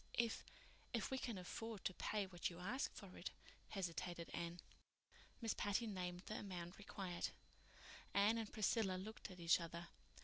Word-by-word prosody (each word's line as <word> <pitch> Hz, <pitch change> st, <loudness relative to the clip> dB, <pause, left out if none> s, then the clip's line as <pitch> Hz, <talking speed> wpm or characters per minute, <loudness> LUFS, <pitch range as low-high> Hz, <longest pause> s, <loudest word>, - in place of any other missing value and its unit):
"If—if 235 Hz, 0 st, -1 dB
we 265 Hz, -, +2 dB
can 235 Hz, -6 st, -1 dB
afford 215 Hz, +3 st, -3 dB
to 190 Hz, -, +3 dB
pay 210 Hz, +2 st, +1 dB
what 185 Hz, 0 st, 0 dB
you 170 Hz, -, -7 dB
ask 215 Hz, +10 st, +1 dB
for -, -, -7 dB
it," -, -, -1 dB, 0.4 s
hesitated 175 Hz, -3 st, -1 dB
Anne. 170 Hz, +1 st, -1 dB, 0.8 s
Miss 225 Hz, -2 st, +3 dB
Patty 205 Hz, +3 st, +2 dB
named 180 Hz, -4 st, -1 dB
the 215 Hz, -, -1 dB
amount 180 Hz, -2 st, -4 dB
required. 190 Hz, -3 st, -1 dB, 0.8 s
Anne 210 Hz, +3 st, +6 dB
and 220 Hz, -2 st, -2 dB
Priscilla 215 Hz, -3 st, +4 dB
looked 215 Hz, +4 st, -4 dB
at 185 Hz, -1 st, -8 dB
each 170 Hz, +1 st, +7 dB
other. 170 Hz, 0 st, -4 dB
190 Hz, 150 wpm, -45 LUFS, 175-220 Hz, 0.8 s, each